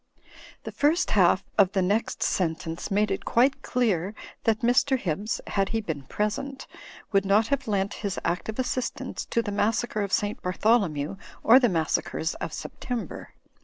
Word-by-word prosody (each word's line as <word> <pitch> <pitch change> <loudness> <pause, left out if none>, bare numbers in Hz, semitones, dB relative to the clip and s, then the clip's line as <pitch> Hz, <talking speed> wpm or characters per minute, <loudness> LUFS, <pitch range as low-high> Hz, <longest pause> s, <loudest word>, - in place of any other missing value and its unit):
The - - -6
first 320 +5 +2
half 190 -1 +4 0.2
of 195 -1 +5
the 195 - +2
next 205 +5 0
sentence 165 -1 -1
made 210 +2 +1
it - - -2
quite 260 +4 +2
clear 210 -5 0 0.3
that 220 -1 +2
Mr. 250 +3 +3
Hibbs 200 +1 -2
(had 195 -1 0
he 225 - 0
been 160 -9 -4
present) 215 - -3 0.5
would 195 -2 +3
not 205 +3 +3
have 275 -2 -1
lent 200 -2 0
his 200 -3 -2
active 180 +6 -2
assistance 255 -1 -3
to 230 - 0
the 205 - -3
Massacre 215 +2 0
of 200 -1 -2
St. 205 0 0
Bartholomew 185 -4 +1 0.3
or 240 +3 +8
the 245 -3 +3
Massacres 160 -1 -1
of - - -5
September. 245 -3 -6
210 Hz, 160 wpm, -26 LUFS, 185-235 Hz, 0.5 s, or